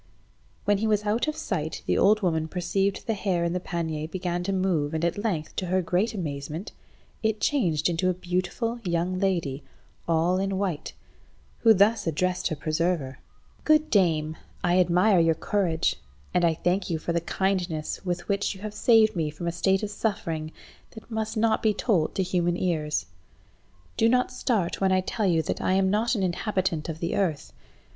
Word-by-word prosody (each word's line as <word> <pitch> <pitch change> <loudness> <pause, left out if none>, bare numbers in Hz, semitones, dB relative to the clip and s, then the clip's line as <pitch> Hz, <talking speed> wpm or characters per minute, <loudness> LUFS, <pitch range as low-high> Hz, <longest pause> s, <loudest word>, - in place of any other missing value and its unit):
When 205 -1 +3
he 220 - 0
was 210 -1 +1
out 220 +7 +1
of 305 - -1
sight - - -3
the - - +1
old 215 +1 +4
woman 160 -3 +1
perceived 195 +3 -1
the 225 - 0
hare 190 -4 0
in 170 0 0
the 180 - 0
pannier 160 -4 -3
began 175 0 -3
to 195 - 0
move, 175 -6 0
and 160 +2 0
at 170 +4 -1
length, 170 -9 -2
to 185 - -2
her 185 +1 +1
great 190 +7 0
amazement, 155 +1 -5 0.5
it 220 -1 0
changed 170 - +1
into 175 +2 +1
a - - +2
beautiful 185 +7 -2
young 175 0 -1
lady, 170 -8 -1 0.4
all 170 +3 +2
in 195 0 -1
white, 185 -6 -2 0.7
who 225 - +6
thus 210 0 +4
addressed 180 +3 0
her 155 - -2
preserver— 155 -2 -1 0.4
"Good 310 0 +3
dame, 160 -5 +2 0.3
I 175 +1 +3
admire 180 +2 +4
your 165 -1 +3
courage, 170 -3 0 0.4
and 180 - +2
I 165 -1 +3
thank 180 +4 0
you 165 - 0
for 170 +2 -3
the 170 - +1
kindness 180 -4 -2
with 175 -2 -3
which 200 0 0
you 190 - -13
have 210 0 -5
saved 220 -1 +4
me 160 -3 0
from 155 +3 -7
a - - +1
state 190 +3 +1
of 210 - -3
suffering 165 -8 -2 0.4
that 220 +1 -12
must 220 0 -2
not 225 0 +2
be 215 -2 +2
told 190 -8 +1
to 190 - +1
human 175 -1 0
ears. 150 - -1 0.9
Do 225 - +4
not 250 +1 +2
start 205 -10 -1
when 190 -1 +3
I 185 0 +3
tell 210 +2 -1
you 165 -3 +2
that - - -3
I 185 - +1
am 190 0 +3
not 225 +4 +1
an 200 - -1
inhabitant 180 -3 -1
of 160 0 -6
the 170 - -1
earth. 170 -7 -1
180 Hz, 190 wpm, -26 LUFS, 165-205 Hz, 0.9 s, who